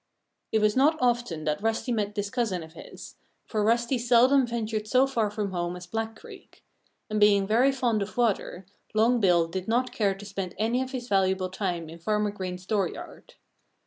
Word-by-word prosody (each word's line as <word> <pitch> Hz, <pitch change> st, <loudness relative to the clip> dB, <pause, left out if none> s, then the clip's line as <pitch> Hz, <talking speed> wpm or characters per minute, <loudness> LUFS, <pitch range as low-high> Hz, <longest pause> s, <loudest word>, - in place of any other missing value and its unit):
It 220 Hz, -, +2 dB
was 210 Hz, 0 st, +2 dB
not 295 Hz, +5 st, +4 dB
often 240 Hz, -, 0 dB
that 150 Hz, +2 st, -1 dB
Rusty 225 Hz, +3 st, -1 dB
met 210 Hz, -3 st, -1 dB
this 205 Hz, -1 st, -3 dB
cousin 220 Hz, -9 st, -1 dB
of 160 Hz, 0 st, -13 dB
his, -, -, -11 dB, 0.3 s
for 215 Hz, -2 st, -1 dB
Rusty 235 Hz, +3 st, +1 dB
seldom 250 Hz, +2 st, +4 dB
ventured 220 Hz, -2 st, -3 dB
so 255 Hz, +4 st, +4 dB
far 230 Hz, -6 st, 0 dB
from 205 Hz, -1 st, -3 dB
home 175 Hz, -1 st, -2 dB
as 180 Hz, 0 st, -9 dB
Black 225 Hz, +5 st, -4 dB
Creek. -, -, -15 dB, 0.4 s
And 215 Hz, -1 st, -2 dB
being 205 Hz, -1 st, +5 dB
very 235 Hz, +7 st, +3 dB
fond 240 Hz, -5 st, 0 dB
of 200 Hz, +4 st, -5 dB
water, 205 Hz, -5 st, 0 dB, 0.3 s
Long 235 Hz, +3 st, +3 dB
Bill 175 Hz, -5 st, +3 dB
did 185 Hz, +2 st, -5 dB
not 245 Hz, +3 st, +1 dB
care 200 Hz, -3 st, +1 dB
to 200 Hz, +1 st, -11 dB
spend 195 Hz, -3 st, -5 dB
any 230 Hz, +5 st, 0 dB
of 260 Hz, -, -3 dB
his 255 Hz, -3 st, -5 dB
valuable 190 Hz, -2 st, +1 dB
time 180 Hz, -3 st, -3 dB
in 165 Hz, +2 st, -11 dB
Farmer 210 Hz, +3 st, 0 dB
Green's 185 Hz, -2 st, -6 dB
dooryard. 195 Hz, -3 st, -4 dB
210 Hz, 190 wpm, -27 LUFS, 190-235 Hz, 0.4 s, being